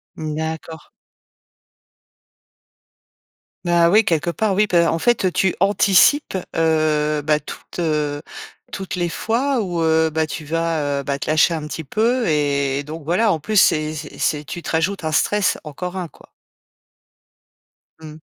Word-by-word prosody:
Mmh, 155 -1 -5
d'accord. 160 0 -6 2.8
Bah, 170 -1 +4
oui, 215 +4 +4
quelque 165 +1 0
part, 210 +4 0
oui, 210 +2 +2
bah, 170 -3 +3
en 165 - -1
fait, 205 -4 +2
tu 190 -2 +1
anticipes, 200 - +3 0.2
heu, 155 -2 +1
bah, 150 +1 +2
toutes, 150 - -10
heu, 150 -3 -1 0.5
toutes 190 -1 -5
les 175 -1 -1
fois 245 +8 0
où, 175 -4 -2
heu, 160 0 +3
bah, 160 0 0
tu 155 +1 -6
vas, 155 -3 -1
heu, - - -5
bah, 140 0 -2
te - - -6
lâcher 155 +2 +4
un 155 -2 -5
petit 160 +1 -6
peu 230 - 0
et 140 -2 0
donc 155 +2 -8
voilà, 190 +8 +2
en 160 - -1
plus, 215 +8 -4
c'est 155 -3 +3
c'est 150 0 -8
c'est 150 -1 0
tu 175 - -6
te - - -7
rajoutes 165 +4 -1
un 155 - -2
stress, 205 +5 +1
encore 180 +5 -6
un, 180 -2 -4
quoi. - - -20 1.7
Mmh. 155 -1 -10
160 Hz, 155 wpm, -20 LUFS, 150-185 Hz, 2.8 s, Bah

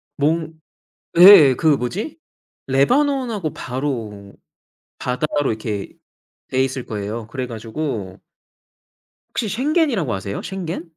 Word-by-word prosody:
몽 160 +2 0 0.7
예예. 175 -8 +10
그 160 - -2
뭐지? 210 - -4 0.5
레바논하고 230 - +1
바로 115 -7 -5 0.7
바다로 140 +2 -1
이렇게 110 -2 -4 0.6
돼 130 0 +1
있을 130 -1 -4
거예요. 105 +1 -5
그래 125 +1 -4
가지고 110 -4 -5 1.1
혹시 225 - -2
솅겐이라고 255 - 0
아세요? 100 +1 -4
솅겐? 180 -2 -5
135 Hz, 230 characters per minute, -20 LUFS, 115-190 Hz, 1.1 s, 예예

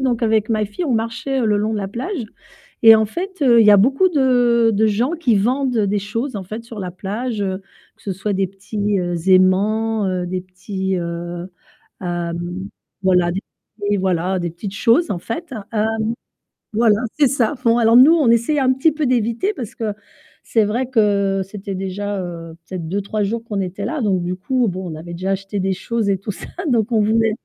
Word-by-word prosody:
donc 250 -3 0
avec 220 -1 +2
ma 215 -2 +1
fille, 205 - -4
on 280 - 0
marchait 230 +4 -2
le 210 -1 +2
long 215 +2 0
de 215 - -1
la 195 - -3
plage 255 - -4 0.6
et 225 0 +10
en 220 0 +3
fait, 370 - -5
heu, 240 -4 +6
il 220 - +5
y - - +8
a - - +8
beaucoup 270 - +4
de 245 -6 +3
de 220 +2 +3
gens 225 +8 +1
qui 310 -10 +1
vendent 250 +4 +1
des 205 -1 +1
choses 230 +7 -4
en 195 - -4
fait, 215 +5 -7
sur 230 -2 -10
la 180 -2 -4
plage, 210 +5 -4
heu, 190 0 -3 0.3
que - - -25
ce 200 - -4
soit 195 +3 -3
des 190 0 +1
petits, 200 +1 -2
heu, 175 -1 -2
aimants, 205 +4 +3
heu, 180 -1 -1
des 185 +1 -3
petits, 190 +1 -4
heu, 170 0 -5 0.6
hem, 175 +1 -4 0.3
voilà, 180 -2 +3
des 190 +3 -3 0.5
des 205 - +3
voilà, 185 0 0
des 175 -1 -2
petites 190 +4 -7
choses, 245 +11 +3
en 175 - -3
fait. 270 - -6 0.2
Hem, 215 -1 +1 0.9
voilà, 220 -1 +4 0.2
c'est 290 - +6
ça. 255 0 +1
Bon, 230 0 +4
alors, 230 0 +5
nous, 275 +6 +8
on 305 -8 +3
essaye 235 +6 +2
un 260 -1 +3
petit 265 +5 +2
peu 305 -1 -1
d'éviter 240 - 0
parce 235 - -7
que 220 -2 -2 0.5
c'est 225 - +2
vrai 240 +5 -1
que 200 -5 +2
c'était 195 0 -7
déjà, 195 +2 -3
heu, 165 -2 -7
peut-être 180 -4 -5
2-3 200 +3 -2
jours 225 +3 -2
qu'on 210 -4 -4
était 190 +2 -5
là. 270 +8 -2
Donc 190 -5 +1
du 180 +1 -2
coup, 250 +5 0
bon, 185 -1 -5
on 155 - -6
avait 165 +2 -9
déjà 185 +3 -2
acheté 195 +1 -3
des 190 0 0
choses 220 +2 -2
et 195 - +2
tout 205 +2 -4
ça. - - -9 0.2
Donc 235 -2 +1
on 220 - +4
voulait 225 +1 +2
210 Hz, 210 wpm, -20 LUFS, 190-235 Hz, 0.9 s, et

